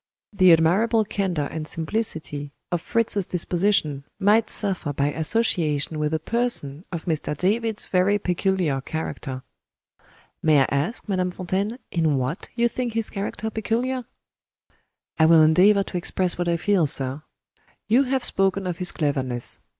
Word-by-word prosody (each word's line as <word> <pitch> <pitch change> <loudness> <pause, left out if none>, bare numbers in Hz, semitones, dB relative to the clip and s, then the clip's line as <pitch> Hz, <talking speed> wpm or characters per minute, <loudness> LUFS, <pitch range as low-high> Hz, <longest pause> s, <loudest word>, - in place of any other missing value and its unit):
The 185 -3 +5
admirable 200 +8 +3
candor 180 -8 -2
and 155 -1 -5
simplicity 160 -6 -3 0.2
of 175 -2 -1
Fritz's 210 -2 0
disposition 175 -5 0 0.2
might 215 +3 +3
suffer 185 -7 -1
by 140 +1 0
association 160 -4 0
with 150 0 0
a 160 - +1
person 165 - -1
of 170 -3 -5
Mr. 155 -3 -2
David's 220 +4 0
very 190 +2 +2
peculiar 180 -6 0
character." 135 -3 -5 1.0
"May 155 -3 +4
I 135 - +2
ask, 145 - -1
Madame 185 -2 0
Fontaine, 190 +5 -3
in 160 -4 +1
what 130 +8 -3
you 235 0 +2
think 240 -1 -3
his 225 -1 +1
character 210 +2 -4
peculiar?" 240 +4 -2 1.1
"I 160 - +6
will 160 -1 +7
endeavor 190 +6 +5
to 180 - -5
express 180 +1 +1
what 175 0 -2
I 170 0 +1
feel, 180 -2 +2
sir. 135 +1 +2 0.7
You 235 +5 +4
have 260 -1 -1
spoken 195 0 +1
of 180 -2 -4
his 180 - +3
cleverness. 130 -5 -2
180 Hz, 145 wpm, -23 LUFS, 155-210 Hz, 1.1 s, will